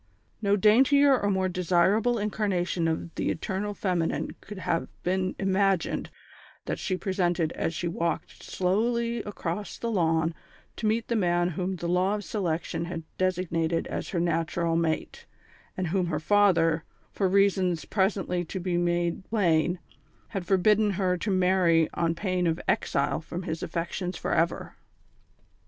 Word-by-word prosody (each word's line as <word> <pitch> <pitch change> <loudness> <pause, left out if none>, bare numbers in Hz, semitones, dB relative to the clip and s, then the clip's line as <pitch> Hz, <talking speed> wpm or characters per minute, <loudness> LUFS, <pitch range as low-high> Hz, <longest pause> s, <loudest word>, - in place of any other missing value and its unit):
No 200 -1 +3
daintier 265 +7 +5
or 205 -5 0
more 190 -1 +1
desirable 185 +6 +2
incarnation 190 -5 0
of 165 +1 -2
the - - -1
eternal 200 +5 -3
feminine 180 -5 -1
could 210 - -9
have 165 -2 -1 0.2
been 185 +1 0
imagined 195 -2 +1 0.6
than - - -2
she 185 - -2
presented 175 -4 0
as 165 - -2
she 175 - -2
walked 170 0 -3
slowly 235 +5 0
across 205 -1 -4
the 235 - -3
lawn 165 -4 +1 0.4
to 220 - -1
meet 220 +1 0
the 235 - 0
man 175 -3 +2
whom 180 +3 -2
the 175 -1 -4
Law 180 +3 +2
of 210 - -5
Selection 170 -4 -2
had 170 -1 -5 0.2
designated 170 -3 0
as - - -4
her 175 - -1
natural 165 0 0
mate, 165 -1 -2 0.5
and 185 -3 -1
whom 185 0 +1
her 155 -3 -1
father, 165 -3 +3 0.3
for 195 - 0
reasons 190 -3 +2
presently 190 -3 0
to 185 +3 -5
be 180 -1 -1
made 175 +1 0
plain, 175 -5 +2 0.5
had 195 -5 -4
forbidden 210 +2 +4
her 185 -1 +1
to 180 +4 -3
marry 180 -4 +3
on 170 -1 0
pain 185 -1 0
of 165 +1 0
exile - - 0
from 170 +3 -6
his 160 0 -4
affections 175 +1 -3
for - - -2
ever. 165 +1 0
180 Hz, 150 wpm, -27 LUFS, 170-200 Hz, 0.6 s, daintier